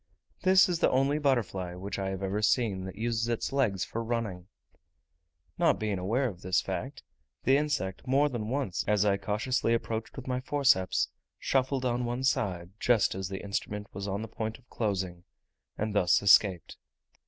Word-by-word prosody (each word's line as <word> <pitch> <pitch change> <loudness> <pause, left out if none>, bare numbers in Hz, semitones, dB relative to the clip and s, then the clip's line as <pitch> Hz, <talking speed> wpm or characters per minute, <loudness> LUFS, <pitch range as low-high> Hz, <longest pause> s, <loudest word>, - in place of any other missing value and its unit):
This 190 0 +6
is 175 -2 -1
the - - +4
only 135 +3 +2
butterfly 110 -11 0
which 100 +2 -5
I 95 0 -2
have 95 0 -4
ever 100 +2 -1
seen, 105 -4 +1
that 95 - -7
uses 115 0 -1
its 120 +3 -2
legs 110 -9 +1
for 115 - -4
running. 110 -6 -3 1.1
Not - - +4
being 105 -3 -2
aware 115 +9 +1
of 95 -6 -7
this 90 0 +2
fact, - - -5 0.4
the 135 - +4
insect, 145 -9 -1
more 140 +3 +4
than 115 -6 -4
once, 130 -9 -1
as 105 -1 +3
I 100 -1 +3
cautiously 115 +4 0
approached 110 -1 -4
with 135 - -7
my 125 -1 -1
forceps, 135 - +2 0.3
shuffled 130 0 0
on 125 0 0
one 120 +2 -2
side 90 -9 0
just 120 -4 +3
as 95 0 -4
the 95 -1 -5
instrument 105 +1 -4
was 100 +1 -5
on 100 +2 -2
the - - -5
point 110 0 -4
of 125 - -26
closing, 95 -5 -2 0.5
and 110 0 -2
thus 90 -4 +4
escaped. 95 -2 +4
110 Hz, 175 wpm, -29 LUFS, 95-130 Hz, 1.1 s, This